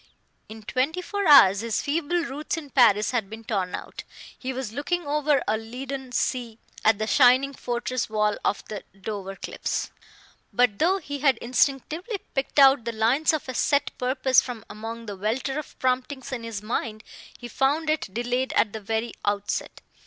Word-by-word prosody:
In 220 Hz, 0 st, -10 dB
twenty 270 Hz, -, -1 dB
four 400 Hz, +1 st, -2 dB
hours 205 Hz, -10 st, +8 dB
his 230 Hz, -1 st, -1 dB
feeble 335 Hz, +3 st, 0 dB
roots 300 Hz, +3 st, -4 dB
in 295 Hz, -4 st, -8 dB
Paris 215 Hz, -5 st, +4 dB
had 225 Hz, -6 st, -1 dB
been 220 Hz, +1 st, -9 dB
torn 195 Hz, -5 st, -2 dB
out. -, -, -8 dB, 0.3 s
He 260 Hz, -, -5 dB
was 260 Hz, -4 st, -4 dB
looking 345 Hz, +7 st, -2 dB
over 295 Hz, -1 st, +1 dB
a 215 Hz, +1 st, +1 dB
leaden 260 Hz, +3 st, -6 dB
sea 240 Hz, -2 st, -1 dB, 0.3 s
at 220 Hz, -1 st, +4 dB
the 215 Hz, -, -1 dB
shining 255 Hz, +3 st, +5 dB
fortress 245 Hz, -1 st, -3 dB
wall 210 Hz, -1 st, +1 dB
of 200 Hz, -, -1 dB
the 210 Hz, -, -6 dB, 0.2 s
Dover 195 Hz, -1 st, -5 dB
cliffs. -, -, -4 dB, 0.6 s
But 245 Hz, -5 st, +2 dB
though 365 Hz, +5 st, +3 dB
he 285 Hz, -6 st, -6 dB
had 270 Hz, -4 st, +3 dB
instinctively 280 Hz, -, 0 dB, 0.2 s
picked 270 Hz, +1 st, -3 dB
out 270 Hz, -3 st, +7 dB
the 235 Hz, -, -2 dB
lines 230 Hz, +7 st, +2 dB
of 315 Hz, -3 st, -3 dB
a 260 Hz, -, -4 dB
set 285 Hz, +3 st, +1 dB
purpose 255 Hz, 0 st, +3 dB
from 240 Hz, -4 st, -7 dB
among 225 Hz, +2 st, -7 dB
the 205 Hz, -2 st, -6 dB
welter 240 Hz, +8 st, -2 dB
of 305 Hz, -, -10 dB
promptings 260 Hz, +2 st, -1 dB
in 255 Hz, -3 st, -3 dB
his 225 Hz, -3 st, -5 dB
mind, 215 Hz, -1 st, -3 dB, 0.3 s
he 245 Hz, -, -8 dB
found 280 Hz, +6 st, +1 dB
it 310 Hz, -10 st, -1 dB
delayed 245 Hz, +4 st, -1 dB
at 210 Hz, -, +2 dB
the 220 Hz, -, -5 dB
very 225 Hz, +3 st, -2 dB
outset. 205 Hz, 0 st, -2 dB
250 Hz, 175 wpm, -25 LUFS, 220-280 Hz, 0.6 s, hours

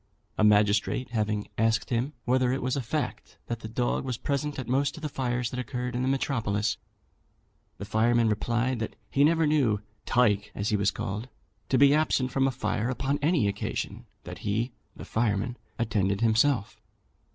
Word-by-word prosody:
A -, -, +1 dB
magistrate 105 Hz, +4 st, +3 dB
having 105 Hz, -2 st, -1 dB
asked 115 Hz, +1 st, +1 dB
him 125 Hz, +5 st, 0 dB
whether 125 Hz, 0 st, +2 dB
it 130 Hz, -, -1 dB
was 130 Hz, 0 st, 0 dB
a 140 Hz, -, -1 dB
fact 115 Hz, -, -4 dB
that 120 Hz, -1 st, -4 dB
the 110 Hz, -, -7 dB
dog 120 Hz, +2 st, -1 dB
was 125 Hz, -3 st, -3 dB
present 145 Hz, +3 st, -2 dB
at 130 Hz, -, -5 dB
most 135 Hz, +4 st, +1 dB
of 155 Hz, -, -10 dB
the 150 Hz, -, -2 dB
fires 125 Hz, -3 st, -1 dB
that 125 Hz, -, -4 dB
occurred 125 Hz, -1 st, -3 dB
in 125 Hz, -, 0 dB
the 130 Hz, -, 0 dB
metropolis, 115 Hz, -7 st, 0 dB, 1.0 s
the 100 Hz, -, -6 dB
fireman 115 Hz, +2 st, +3 dB
replied 120 Hz, +4 st, 0 dB
that 110 Hz, -, -4 dB, 0.2 s
he 140 Hz, -, +3 dB
never 160 Hz, +1 st, +4 dB
knew 135 Hz, -9 st, +2 dB, 0.3 s
"Tyke," 105 Hz, -4 st, +3 dB
as 100 Hz, +1 st, -1 dB
he 110 Hz, -, +2 dB
was 100 Hz, -1 st, +2 dB
called, 105 Hz, +7 st, -4 dB, 0.4 s
to 130 Hz, -, +3 dB
be 140 Hz, +1 st, +6 dB
absent 145 Hz, -4 st, +2 dB
from 135 Hz, 0 st, +2 dB
a -, -, +1 dB
fire 115 Hz, -1 st, -1 dB
upon 135 Hz, +3 st, -1 dB
any 150 Hz, -, +3 dB
occasion 100 Hz, -, -4 dB, 0.2 s
that -, -, -8 dB
he 110 Hz, +5 st, -1 dB, 0.2 s
(the -, -, -9 dB
fireman) 110 Hz, +1 st, 0 dB, 0.2 s
attended 105 Hz, -4 st, 0 dB
himself. 115 Hz, 0 st, +2 dB
120 Hz, 180 wpm, -28 LUFS, 110-130 Hz, 1.0 s, be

